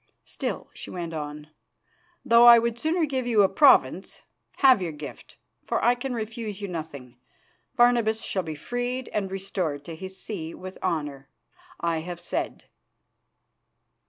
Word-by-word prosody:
Still," - - -5
she - - -9
went 170 -2 -5
on, 150 0 -6 0.7
"though 235 +1 +7
I 235 0 +11
would 235 0 0
sooner 320 +3 +1
give 260 -4 -2
you 220 -4 +4
a - - +5
province, 290 +8 +3 0.3
have 260 -6 +5
your 175 -3 -2
gift, 150 -1 -10 0.3
for - - 0
I 240 - +6
can 245 +1 -4
refuse 220 -2 -5
you 200 - -4
nothing. 145 -8 -7 0.6
Barnabas 235 -2 +3
shall 190 - -1
be 160 -3 -6
freed 245 - -4
and 200 -2 -2
restored 185 -7 -3
to 165 - -7
his 190 +3 -8
see 170 -7 -6
with 185 0 -9
honour. 145 -6 -3 0.5
I 170 -1 0
have 175 +1 -6
said." 175 - -4
195 Hz, 150 wpm, -26 LUFS, 160-235 Hz, 0.7 s, I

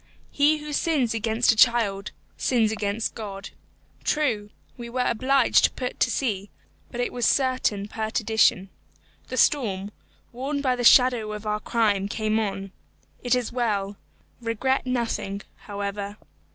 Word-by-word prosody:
He 300 +2 +3
who 300 0 -7
sins 285 -7 +1
against 225 +2 +2
a - - -1
child, 215 -4 +3 0.3
sins 230 -4 +1
against 215 0 -2
God. 195 -3 -7 0.5
True, 230 -9 0 0.3
we 240 -1 -8
were 250 +1 -1
obliged 260 +2 +3
to - - +3
put 250 -1 -5
to - - +3
sea, 205 -7 -2 0.4
but 240 - -7
it 245 - -1
was 245 - -4
certain 255 -7 +1
perdition. 220 -3 +1 0.6
The 255 - -5
storm, 205 -8 +1 0.4
warned 280 +4 -3
by 255 -2 +2
the 245 - -3
shadow 240 -3 +5
of 210 0 -7
our 210 0 -1
crime, 210 -3 +1
came 215 +1 0
on. 195 -2 -3 0.5
It 245 0 +2
is 250 -2 -2
well. 205 -5 -1 0.5
Regret 255 +4 -1
nothing, 230 -5 -2
however. 200 0 -5
225 Hz, 140 wpm, -25 LUFS, 205-250 Hz, 0.6 s, shadow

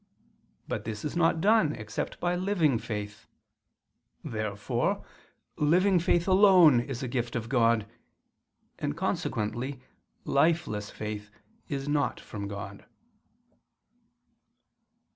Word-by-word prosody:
But - - -3
this 110 +1 -5
is 150 - -3
not 165 -1 +2
done 205 -7 +4
except 110 0 -5
by 175 0 0
living 175 - +1
faith. 105 -2 -6 1.0
Therefore 105 -2 -2 0.5
living 180 +5 +3
faith 170 +1 +1
alone 185 - +7
is 130 +2 -4
a - - -2
gift 120 -1 -2
of 115 -2 -3
God: 115 -4 +3 0.9
and 75 - -3
consequently 120 +6 -2 0.5
lifeless 140 -9 +1
faith 105 -1 -6 0.4
is 140 -1 -3
not 145 -1 0
from 100 -1 -7
God. 100 0 -7
130 Hz, 105 wpm, -28 LUFS, 110-165 Hz, 1.0 s, alone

